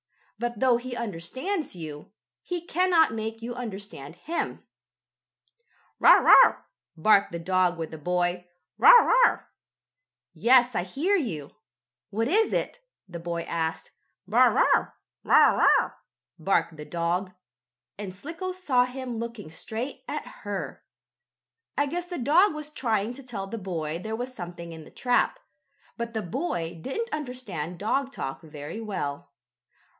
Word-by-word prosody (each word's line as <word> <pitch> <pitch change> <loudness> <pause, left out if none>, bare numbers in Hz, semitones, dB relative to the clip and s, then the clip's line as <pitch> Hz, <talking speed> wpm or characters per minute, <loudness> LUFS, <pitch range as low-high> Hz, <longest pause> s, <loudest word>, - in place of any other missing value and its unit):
But, 240 -2 -3
though 255 -1 +4
he 245 +1 -6
understands 235 - -4
you, 155 -3 -8 0.3
he 350 -1 -5
cannot 350 -5 +3
make 225 +1 -5
you 240 +1 -4
understand 200 - -7
him. 320 - -4 1.4
"Bow - - +7
wow!" - - +7 0.3
barked 200 +4 +4
the 170 - -4
dog 180 +1 +1
with 160 -1 -5
the 160 - -8
boy. 180 +2 -1 0.3
"Bow - - +8
wow!" - - +7 0.9
"Yes, 250 +1 +4
I 175 - 0
hear 290 - 0
you. 170 - -3 0.6
What 225 +3 -1
is 425 +9 +3
it?" - - -2 0.3
the 175 -2 -7
boy 170 0 -3
asked. 160 -1 -3 0.4
"Bow - - +4
wow! - - +3 0.3
Wow! - - +5
Wow!" - - +4 0.5
barked 170 -1 +1
the 150 - -8
dog, 175 +4 -2 0.7
and 200 -2 -5
Slicko 330 - -5
saw 285 -10 +2
him 250 -2 -5
looking 230 -7 -6
straight 225 - -6
at - - -4 0.2
her. - - -5 0.9
I 285 - +3
guess 345 +5 -3
the 355 0 -6
dog 310 - +4
was 305 0 -6
trying 225 -5 -1
to 275 - -11
tell 230 -7 -6
the 225 +3 -6
boy 165 -4 -4
there 220 +4 -4
was 250 +2 -5
something 175 -5 -8
in 160 -1 -9
the - - -14
trap, 245 -1 +1 0.6
but 235 -1 -5
the 220 - -1
boy 175 - -3
didn't 455 - -3
understand 230 - -5
dog 265 +8 -1
talk 135 - -5
very 150 +5 -8
well. 165 -10 -4
220 Hz, 140 wpm, -26 LUFS, 170-265 Hz, 1.4 s, Bow